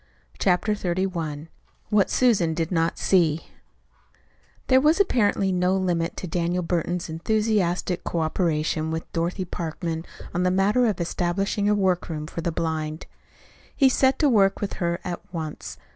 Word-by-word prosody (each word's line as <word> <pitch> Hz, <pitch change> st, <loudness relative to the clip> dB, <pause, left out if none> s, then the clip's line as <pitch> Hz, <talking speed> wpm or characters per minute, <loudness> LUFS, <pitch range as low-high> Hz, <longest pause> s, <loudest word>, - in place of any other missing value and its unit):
CHAPTER 190 Hz, +3 st, +2 dB
XXXI 175 Hz, -6 st, -2 dB, 0.4 s
WHAT 205 Hz, -2 st, +3 dB
SUSAN 195 Hz, -11 st, +2 dB
DID 165 Hz, +1 st, -2 dB
NOT 165 Hz, -1 st, +1 dB
SEE 165 Hz, -4 st, +2 dB, 1.2 s
There 260 Hz, 0 st, +5 dB
was 310 Hz, +6 st, +3 dB
apparently 205 Hz, -, +2 dB
no 180 Hz, +1 st, +2 dB
limit 175 Hz, -3 st, -1 dB
to -, -, -4 dB
Daniel 175 Hz, +1 st, -1 dB
Burton's 175 Hz, +1 st, -1 dB
enthusiastic 185 Hz, 0 st, 0 dB
cooperation 160 Hz, -1 st, -1 dB
with 160 Hz, 0 st, -5 dB
Dorothy 175 Hz, +3 st, -1 dB
Parkman 165 Hz, -1 st, -4 dB, 0.3 s
on 175 Hz, -, 0 dB
the 180 Hz, -, +3 dB
matter 205 Hz, +6 st, +3 dB
of 205 Hz, -5 st, -1 dB
establishing 185 Hz, +4 st, 0 dB
a 210 Hz, -, +3 dB
workroom 180 Hz, -5 st, 0 dB
for 165 Hz, -, -6 dB
the 170 Hz, -, -1 dB
blind. 160 Hz, -1 st, -3 dB, 0.7 s
He 270 Hz, -2 st, +5 dB
set 265 Hz, +1 st, +3 dB
to 300 Hz, -, +3 dB
work 200 Hz, -7 st, +3 dB
with 205 Hz, -, -3 dB
her 170 Hz, 0 st, 0 dB
at 175 Hz, -, -4 dB
once. 160 Hz, -3 st, -6 dB
180 Hz, 145 wpm, -24 LUFS, 165-200 Hz, 1.2 s, There